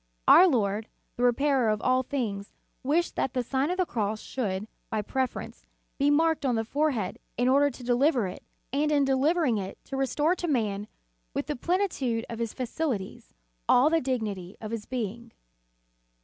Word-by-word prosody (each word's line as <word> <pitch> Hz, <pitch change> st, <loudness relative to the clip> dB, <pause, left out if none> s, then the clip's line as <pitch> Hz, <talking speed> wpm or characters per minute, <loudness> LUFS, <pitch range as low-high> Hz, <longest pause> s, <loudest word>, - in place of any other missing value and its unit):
Our 370 Hz, -, +9 dB
Lord, 215 Hz, -, 0 dB, 0.3 s
the -, -, -5 dB
Repairer 250 Hz, 0 st, +3 dB
of 215 Hz, -1 st, +1 dB
all 255 Hz, +3 st, +2 dB
things, 220 Hz, -7 st, -4 dB, 0.3 s
wished 315 Hz, +6 st, +1 dB
that 265 Hz, -, -1 dB
the 250 Hz, -, +1 dB
Sign 265 Hz, +4 st, 0 dB
of 360 Hz, -, -1 dB
the 370 Hz, -, +2 dB
Cross 215 Hz, -5 st, -2 dB
should, 210 Hz, -5 st, -3 dB, 0.2 s
by 220 Hz, -2 st, -1 dB
preference, 260 Hz, +4 st, -3 dB, 0.3 s
be 280 Hz, +1 st, +4 dB
marked 320 Hz, +1 st, +3 dB
on 255 Hz, -3 st, +1 dB
the 225 Hz, 0 st, -1 dB
fore 295 Hz, +6 st, +1 dB
head, 215 Hz, -10 st, -3 dB, 0.2 s
in 245 Hz, +1 st, +2 dB
order 280 Hz, +2 st, +4 dB
to 250 Hz, -1 st, -11 dB
deliver 245 Hz, 0 st, +2 dB
it, 180 Hz, -, -6 dB, 0.3 s
and 300 Hz, +2 st, +1 dB
in 285 Hz, -2 st, +3 dB
delivering 270 Hz, -2 st, +2 dB
it, 190 Hz, 0 st, -6 dB
to 270 Hz, -, -6 dB
restore 295 Hz, +5 st, +2 dB
to 350 Hz, -, -3 dB
man, 210 Hz, -8 st, 0 dB, 0.5 s
with -, -, -1 dB
the 295 Hz, -, -3 dB
plenitude 275 Hz, -, 0 dB
of 230 Hz, -, -5 dB
his 230 Hz, -2 st, -2 dB
faculties, 235 Hz, -, -4 dB, 0.3 s
all 270 Hz, +5 st, +6 dB
the 330 Hz, 0 st, +3 dB
dignity 210 Hz, -8 st, -3 dB
of 215 Hz, -1 st, -6 dB
his 230 Hz, -2 st, -5 dB
being. 235 Hz, -1 st, -4 dB
250 Hz, 175 wpm, -28 LUFS, 220-285 Hz, 0.5 s, Our